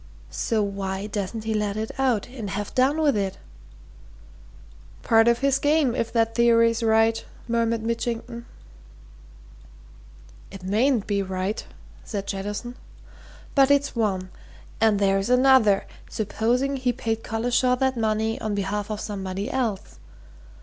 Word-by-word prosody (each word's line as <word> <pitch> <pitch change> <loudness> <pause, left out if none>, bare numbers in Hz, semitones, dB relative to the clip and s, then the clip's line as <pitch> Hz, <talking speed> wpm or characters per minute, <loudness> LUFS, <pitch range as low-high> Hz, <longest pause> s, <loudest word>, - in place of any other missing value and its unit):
so 220 -3 0
why 195 -1 -3
doesn't 210 +1 -4
he 220 0 -2
let 210 -1 -1
it 220 0 -3
out, 250 -6 +1
and 235 -6 -6
have 205 +1 -4
done 270 +5 +2
with 295 -5 +3
it?" 195 -2 -2 1.7
"Part 225 -1 +4
of 235 0 +4
his 275 +1 +1
game 290 -4 +2
if 230 -2 -2
that 225 -1 +1
theory's 230 0 +3
right," 225 0 +3 0.2
murmured 230 -1 0
Mitchington. 235 +1 -3 2.0
"It 195 -2 -11
mayn't 220 +4 +1
be 200 -1 0
right," 190 +2 -3 0.4
said 200 -2 -5
Jettison. 205 +5 -5 0.8
"But 275 -1 +5
it's 285 -1 +2
one. 190 -5 -1 0.5
And 220 -2 +3
there's 195 +1 +1
another 250 -5 +4 0.2
supposing 235 +6 0
he 255 -1 +1
paid 225 -1 -3
Collishaw 245 +3 +1
that 265 0 +1
money 220 -1 -1
on 215 -1 -2
behalf 205 +1 -2
of 215 -1 -3
somebody 195 +2 -4
else? 235 -8 -3
225 Hz, 130 wpm, -24 LUFS, 205-245 Hz, 2.0 s, But